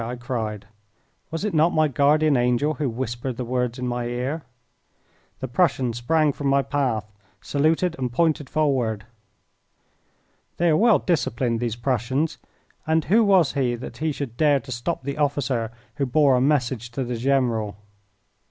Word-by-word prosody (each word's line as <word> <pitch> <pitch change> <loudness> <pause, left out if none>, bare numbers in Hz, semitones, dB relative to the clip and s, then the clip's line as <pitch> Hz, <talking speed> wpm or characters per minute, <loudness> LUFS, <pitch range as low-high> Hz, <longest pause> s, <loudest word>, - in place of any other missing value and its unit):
I 120 +2 -4
cried. 115 -4 -4 0.6
Was 165 +5 -3
it 210 - -2
not 160 +2 +3
my 155 -1 +4
guardian 145 +2 +3
angel 125 +5 +2
who 145 -3 -2
whispered 120 +1 -4
the 125 - -3
words 125 0 -1
in 125 0 -3
my 120 0 -2
ear? 125 +6 -3 1.0
The 130 - -2
Prussian 130 -3 +1
sprang 150 +5 +1
from 145 - -3
my 140 0 +3
path, 130 -8 -1 0.3
saluted, 160 +4 +1
and 125 -2 -2
pointed 155 +1 +1
forward. 125 -9 0 1.5
They 170 0 +2
are 155 - +4
well 225 +3 +5
disciplined, 120 -8 0
these 115 -2 -2
Prussians, 130 +5 -1 0.5
and 160 0 +2
who 225 +5 +4
was 190 -8 +4
he 130 -4 0
that 120 - -8
he 155 0 -1
should 135 -5 -6
dare 145 -2 +4
to 130 - -10
stop 125 +5 -3
the 140 +2 -4
officer 135 -6 0 0.3
who 140 -2 0
bore 145 +1 +4
a 125 - +2
message 130 -4 0
to 135 - -2
the 125 0 -3
general? 115 -5 0
135 Hz, 160 wpm, -23 LUFS, 120-155 Hz, 1.5 s, well